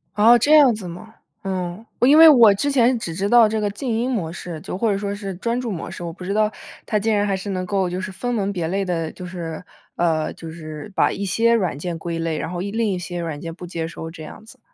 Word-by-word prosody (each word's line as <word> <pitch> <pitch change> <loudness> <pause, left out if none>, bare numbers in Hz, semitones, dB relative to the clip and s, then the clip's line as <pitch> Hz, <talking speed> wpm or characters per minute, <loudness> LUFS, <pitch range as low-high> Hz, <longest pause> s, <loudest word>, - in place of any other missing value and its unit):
哦， 225 +4 +7
这 290 +6 +4
样 285 -5 +7
子 210 -4 -6
吗？ 180 +6 -10 0.3
嗯， 185 +1 -4
我 245 - +4
因 290 +3 +7
为 325 0 +10
我 235 -9 +8
之 285 +9 -1
前 250 -2 +3
只 170 -6 -5
知 195 +4 -2
道 235 -1 +7
这 215 0 -1
个 205 - 0
静 210 +6 -5
音 230 +3 0
模 180 -10 -2
式， 175 -2 -7
就 - - -5
或 225 +2 +1
者 195 - 0
说 200 0 -3
是 200 -1 -5
专 235 +6 -2
注 240 -3 -3
模 175 - -5
式。 - - -8
我 170 - -4
不 180 +2 -11
知 190 +2 -2
道， 215 0 +2 0.3
它 215 - 0
竟 220 +1 +1
然 205 0 +2
还 200 -1 0
是 195 +2 -6
能 185 -1 -2
够 190 -1 0
就 180 +1 -3
是 185 0 -5
分 245 +6 -3
门 200 -3 -1
别 175 -5 -2
类 195 +4 -1
的， 165 -4 -2
就 180 - -9
是 170 -2 -6 0.3
呃， 160 -2 0
就 165 - -9
是， 155 +3 -9
把 - - +3
一 200 - -4
些 225 +5 +2
软 185 -10 0
件 170 +2 -4
归 165 0 -4
类， 165 -1 -2
然 - - -4
后 175 -1 -4
一 200 +2 -4
另 225 0 0
一 185 - -2
些 175 0 -5
软 165 -4 -4
件 165 +2 -6
不 180 +1 -9
接 165 -2 -4
收 165 0 -8
这 160 -1 -10
样 185 - -11
子。 255 +3 -16
195 Hz, 300 characters per minute, -21 LUFS, 170-220 Hz, 0.3 s, 为